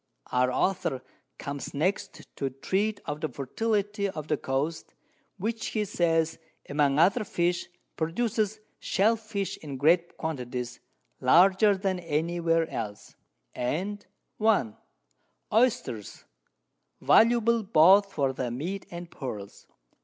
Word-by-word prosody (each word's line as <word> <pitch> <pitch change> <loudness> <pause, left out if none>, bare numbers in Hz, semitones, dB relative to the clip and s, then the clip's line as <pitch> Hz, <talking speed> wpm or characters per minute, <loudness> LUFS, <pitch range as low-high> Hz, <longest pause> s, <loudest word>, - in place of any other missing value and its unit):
Our 125 0 +2
Author 135 -4 0 0.3
comes 140 -1 -6
next 190 +6 -1
to 135 - -1
treat 200 +10 -1
of 150 +1 -4
the 155 - -1
Fertility 205 - -1
of 155 -5 -7
the 155 - +3
Coast, 140 +6 -3 0.4
which, 225 +4 -3
he 215 -1 -1
says, 165 -3 +1 0.3
among 145 -1 +2
other 195 +8 +4
Fish 175 -3 -1 0.3
produces 215 +5 -1 0.2
Shell 220 +4 +2
Fish 200 -4 -4
in 140 -4 -7
greater 170 +5 +3
Quantities, 125 -5 -4 0.4
larger 190 +9 +5
than 190 -1 -1
any 170 +1 -1
where 165 -1 +2
else, 105 -2 -6 0.4
and 190 +11 -2 0.3
1. 210 - +2 0.8
Oisters, 230 - 0 0.7
valuable 235 0 +4
both 195 +1 +5
for 140 -6 0
their 130 -1 -3
Meat 170 +11 -4
and 175 0 -8
Pearls. 105 -8 -7
170 Hz, 115 wpm, -28 LUFS, 140-205 Hz, 0.8 s, larger